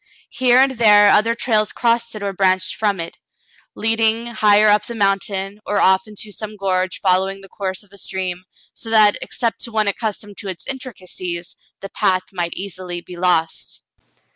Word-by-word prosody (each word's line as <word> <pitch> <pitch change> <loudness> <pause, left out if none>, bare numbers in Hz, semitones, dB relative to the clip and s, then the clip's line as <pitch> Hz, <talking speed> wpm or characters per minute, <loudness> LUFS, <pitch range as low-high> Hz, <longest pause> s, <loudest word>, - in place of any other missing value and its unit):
Here 250 -1 +3
and 265 +1 +5
there 210 -4 +6
other 230 +2 +3
trails 215 -3 +1
crossed 235 -1 0
it 210 - -6
or 200 -1 -2
branched 185 -1 +1
from 205 -3 0
it, 165 - -6 0.6
leading 225 +1 +1
higher 215 -2 +4
up 210 0 +4
the 235 - -6
mountain, 195 -1 -1
or 205 - -1
off 190 +4 +3
into 210 0 -7
some 215 +1 -6
gorge 185 -2 -1
following 190 +1 +1
the 195 - -13
course 190 0 -4
of 200 - -24
a 200 - -10
stream, 185 -1 -4 0.3
so 225 - -6
that, 215 -2 +5
except 230 -2 -2
to 235 - -9
one 215 -1 +1
accustomed 205 0 -3
to 200 - -6
its 185 -3 -6
intricacies, 185 -9 -6 0.3
the 195 - -7
path 185 -1 +1
might 175 -2 -2
easily 185 -2 -6
be 180 - -11
lost. 175 -2 -1
200 Hz, 175 wpm, -19 LUFS, 185-220 Hz, 0.6 s, there